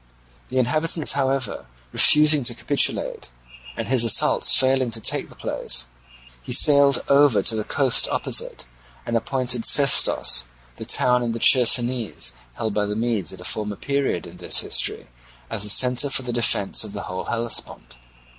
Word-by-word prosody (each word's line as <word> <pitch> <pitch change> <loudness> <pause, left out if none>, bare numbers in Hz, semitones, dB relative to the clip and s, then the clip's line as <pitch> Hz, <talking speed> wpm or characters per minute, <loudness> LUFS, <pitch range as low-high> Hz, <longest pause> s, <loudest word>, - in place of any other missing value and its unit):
The 130 - -5
inhabitants, 155 +5 0
however, 135 - -3 0.3
refusing 150 -1 +4
to 120 - -4
capitulate, 145 - -2 0.5
and - - -5
his 130 -2 +1
assaults 115 - +4
failing 130 -1 +1
to 115 0 -6
take - - -2
the - - -17
place, - - -2 0.5
he - - -6
sailed 140 -3 +4
over 140 -4 +3
to 115 - -2
the 110 - -3
coast 130 +2 +1
opposite, - - -2 0.4
and 115 - -4
appointed 125 0 -2
Sestos, 140 - +3 0.3
the - - -8
town 125 0 +2
in 120 -1 -3
the 115 - -6
Chersonese 120 - +1 0.2
held 110 -2 -4
by 105 0 -2
the 105 - -5
Medes 110 -6 -2
at 95 - -11
a - - -11
former 105 +2 -4
period 140 -8 -3
in 85 +1 -14
this 90 - +1
history, - - -1 0.5
as 115 -2 -4
the 105 - -1
centre 125 +5 +4
for 135 - 0
the 125 -1 -5
defence 115 -4 0
of 105 -2 -9
the 100 - -7
whole 90 0 -7
Hellespont. 115 - -3
120 Hz, 165 wpm, -21 LUFS, 110-135 Hz, 0.5 s, refusing